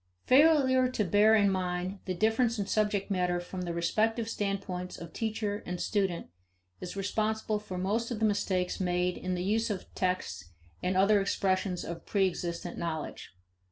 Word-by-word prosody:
Failure 260 -3 +5
to 225 -5 0
bear 210 +4 +5
in 200 -2 +4
mind 185 +1 -2
the 185 - -2
difference 225 +4 +2
in 200 - -1
subject 210 -1 0
matter 180 -2 +1
from 180 +1 -6
the 175 -1 -3
respective 220 +7 0
standpoints 195 -4 -3
of 170 -1 -9
teacher 215 -2 -2
and 180 0 -4
student 190 -5 0 0.5
is 180 - -6
responsible 215 +2 -1
for 190 -3 -7
most 210 +6 0
of 240 - -3
the 220 - +1
mistakes 195 -3 0
made 180 -1 0
in 185 0 -3
the 180 - -2
use 220 +4 +1
of 200 -3 -5
texts 95 - -2 0.3
and 185 +1 0
other 200 +2 +5
expressions 185 -1 0
of 170 0 -6
preexistent 175 -3 -1
knowledge. 160 - -5
195 Hz, 160 wpm, -30 LUFS, 180-215 Hz, 0.5 s, Failure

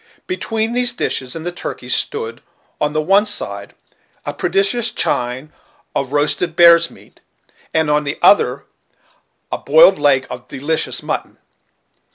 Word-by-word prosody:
Between 225 -11 -2
these 245 0 +2
dishes 130 - -2
and 165 0 -7
the 175 - -2
turkeys 175 - -4
stood, 455 +1 -2 0.4
on 150 - 0
the 155 - +1
one 195 +5 +3
side, 205 - -5 0.5
a - - -3
prodigious 245 - 0
chine 125 +5 -2 0.4
of 135 -1 -2
roasted 150 +3 0
bear's 170 -1 +6
meat, - - -19 0.5
and 160 -1 +1
on 150 0 +2
the 145 +1 -4
other 205 - +3 0.9
a - - -2
boiled - - +5
leg 135 -2 +3
of 125 0 -9
delicious 150 +4 -2
mutton. - - -4
165 Hz, 140 wpm, -18 LUFS, 145-225 Hz, 0.9 s, bear's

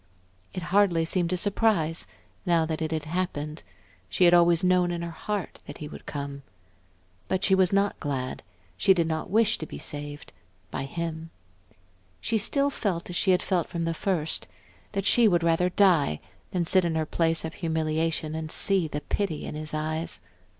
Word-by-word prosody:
It 185 - -5
hardly 185 -5 +4
seemed 175 +1 0
a 180 - +1
surprise, 185 -5 +1 0.4
now 170 -3 +2
that 160 0 -3
it 160 0 -2
had 155 -2 -2
happened; 155 -2 -3 0.5
she 135 - +1
had 175 - +6
always 170 -1 +5
known 180 -1 +3
in 170 -1 -3
her 170 - -4
heart 205 +2 -4
that 145 - -8
he 150 - -7
would - - -11
come. 140 -1 -5 0.9
But 190 0 -1
she 190 - +4
was 190 -2 +4
not 200 0 +1
glad, 135 -3 -3 0.4
she 190 - +5
did 170 -2 +2
not 160 +2 -3
wish 220 +2 +3
to 155 - -5
be - - -8
saved 145 0 -7 0.4
by 135 - -3
him. 165 +2 -5 0.9
She 225 -1 0
still 280 +7 +2
felt 180 -8 -2
as - - -5
she 190 - +1
had 185 0 +4
felt 180 -3 0
from 170 -1 -3
the 165 - 0
first, 165 -2 -1 0.5
that 195 -1 -2
she 235 +1 +6
would 175 -4 +2
rather 170 +2 +2
die 175 - +3 0.3
than 175 -2 -1
sit 185 +2 +4
in 170 -2 -1
her 160 -1 0
place 165 +1 0
of 160 - -5
humiliation 160 -1 -1
and 160 0 -4
see 195 -4 +4
the 150 -1 -4
pity 170 -1 -2
in - - -5
his 155 0 -5
eyes.... 155 - -2
170 Hz, 185 wpm, -27 LUFS, 155-185 Hz, 0.9 s, had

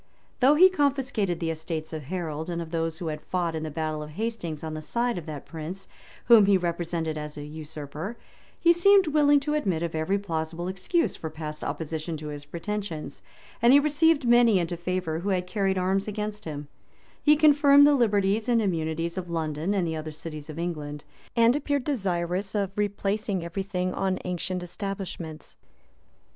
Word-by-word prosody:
Though 270 +4 +6
he 365 +5 +8
confiscated 270 - 0
the 165 -1 -1
estates 160 0 -5
of 155 -3 -5
Harold, 160 -1 -4
and 170 -1 -2
of 165 -1 -6
those 165 -1 -1
who 165 -1 -4
had 150 -1 -5
fought 175 -2 -1
in 160 - -3
the 155 - -3
battle 155 0 -3
of 150 - -7
Hastings 175 -4 -4
on 160 -1 -4
the 155 - -5
side 240 +8 -1
of 175 -3 -6
that 150 -3 -6
prince, 165 +4 -7 0.4
whom 225 -4 +7
he 200 -1 +5
represented 170 -2 -2
as 150 0 -6
a 145 - -6
usurper, 155 +6 -7 0.4
he 340 0 +6
seemed 390 +3 +6
willing 290 -1 +4
to 295 +1 -1
admit 190 - 0
of 170 - -3
every 160 +5 0
plausible 165 -2 -3
excuse 190 - 0
for 160 - -5
past 155 -1 -6
opposition 160 0 -3
to 150 0 -7
his 145 -1 -7
pretensions, 165 -2 -5 0.4
and 235 +2 +6
he 285 - +9
received 300 -1 +3
many 240 -3 +6
into 175 -1 -1
favor 175 -2 -2
who 195 +4 -3
had 180 -2 0
carried 190 0 0
arms 190 +2 +1
against 210 0 -4
him, 150 -2 -6 0.5
He 300 0 +6
confirmed 285 -1 +6
the 290 - +6
liberties 215 -3 +2
and 235 -1 +4
immunities 170 -3 -1
of 175 -1 -7
London 160 +3 -1
and 185 -3 +1
the 160 -1 -2
other 155 0 -5
cities 155 -1 -7
of 155 - -7
England; 150 -4 -4 0.3
and 235 +1 +5
appeared 285 -2 0
desirous 195 - -1
of 200 -2 0
replacing 205 -2 -1
every 170 +3 -3
thing 185 -1 -2
on 190 -1 0
ancient 180 0 -3
establishments. 180 -4 -6
180 Hz, 185 wpm, -26 LUFS, 160-215 Hz, 0.5 s, he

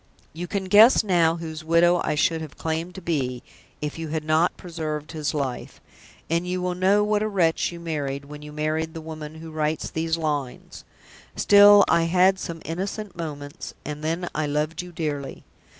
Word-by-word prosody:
You 175 +3 -5
can 195 +2 -2
guess 215 +7 +7
now 170 -5 +3
whose 160 -2 -7
widow 170 +2 +4
I - - 0
should 160 +2 +1
have 155 -3 -9
claimed 165 +2 -3
to 190 - -9
be, 130 -7 -2 0.4
if 150 +2 -4
you 165 - -4
had 155 0 -3
not 155 +3 +2
preserved 155 -3 -5
his 155 -2 -3
life; 135 -4 -4 0.5
and 170 +2 0
you 180 0 -1
will 180 0 -1
know 190 +3 +3
what 210 0 +1
a 215 - 0
wretch 175 -7 +1
you 170 - -8
married 145 -4 -3
when 150 +1 -10
you 150 0 -9
married 155 +2 -2
the - - -4
woman 155 -1 -8
who 160 0 -9
writes 155 0 -2
these 160 0 -1
lines. 145 -5 -4 0.5
Still, 205 0 +7
I 165 0 +3
had 185 +2 +3
some 165 -2 -6
innocent 195 +4 -4
moments, 145 -4 -7
and 150 0 -6
then 165 +3 -2
I 155 -1 -1
loved 150 +3 -1
you 180 0 -10
dearly. 150 -4 -4
160 Hz, 185 wpm, -24 LUFS, 150-180 Hz, 0.5 s, guess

